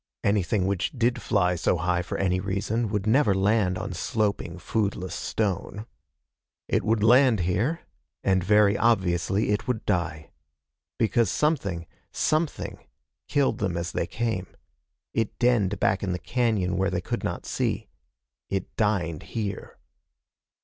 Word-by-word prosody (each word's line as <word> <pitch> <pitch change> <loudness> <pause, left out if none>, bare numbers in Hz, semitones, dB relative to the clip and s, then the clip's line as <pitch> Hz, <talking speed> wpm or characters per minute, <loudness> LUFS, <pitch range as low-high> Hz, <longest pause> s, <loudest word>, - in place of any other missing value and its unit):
Anything 100 0 +1
which 95 -1 0
did 120 -1 +1
fly 90 -4 +2
so 90 +1 +1
high 90 0 +1
for 85 - -4
any 90 -1 +1
reason 100 +4 -1
would 105 -1 -1
never 110 -2 +4
land 95 -1 +2
on 95 +1 -4
sloping, 100 -1 -1
foodless 95 -1 -2
stone. 105 +1 -2 0.8
It - - +1
would 110 -1 +1
land 120 -2 +5
here. 110 - 0 0.4
And 95 -2 +2
very 105 +1 +4
obviously 95 -2 +2
it 105 - -1
would 125 -4 -2
die. 85 -5 -1 0.7
Because 115 -1 +2
something 100 - 0 0.3
something 155 0 -1 0.5
killed 140 +8 +1
them 95 -4 -1
as 85 0 -3
they - - -1
came. 110 -6 -2 0.7
It 115 -2 -1
denned 115 -6 +2
back 95 - +2
in 95 -3 -1
the - - -1
cañon 105 -3 0
where 95 +1 +1
they 90 -2 -1
could - - -3
not - - -3
see. - - -1 0.6
It 95 -1 -3
dined 90 -8 0
here. 105 -4 -5
100 Hz, 140 wpm, -26 LUFS, 90-115 Hz, 0.8 s, land